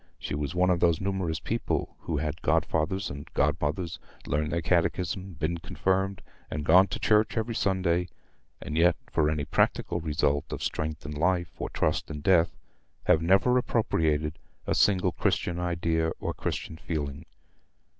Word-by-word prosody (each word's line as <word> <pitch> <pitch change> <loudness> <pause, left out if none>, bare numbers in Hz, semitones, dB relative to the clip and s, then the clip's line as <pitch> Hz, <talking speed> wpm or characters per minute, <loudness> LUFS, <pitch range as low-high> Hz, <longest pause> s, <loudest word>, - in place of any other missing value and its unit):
She - - -5
was 75 +3 -3
one 90 +1 +3
of 90 - +2
those 85 -2 +3
numerous 95 -5 -1
people - - -2
who 80 - -3
have 75 - -1
had 75 - -7
godfathers 95 +5 0
and 70 +1 -9
godmothers, 80 +3 0 0.3
learned 75 +2 -1
their 85 - +1
catechism, 90 +2 0
been 80 +2 -2
confirmed, 95 +2 -1 0.3
and 75 -1 -4
gone 90 +5 +7
to - - -4
church 110 +1 +3
every 115 +1 -1
Sunday, 90 -4 +1 0.5
and 75 - -5
yet, 85 +1 +5 0.2
for 75 -1 +2
any 75 -2 -1
practical 85 - +1
result 75 -3 0
of - - -4
strength 80 -1 -3
in 75 - -5
life, 85 +3 0
or - - -2
trust - - -1
in 75 -1 -5
death, 85 +1 +3 0.5
have 80 - +4
never 95 +9 +4
appropriated 80 -10 0 0.3
a - - 0
single 95 -2 +3
Christian 85 +2 0
idea 85 -2 0
or - - -2
Christian 80 - -4
feeling. 75 -1 -4
85 Hz, 160 wpm, -28 LUFS, 75-95 Hz, 0.5 s, gone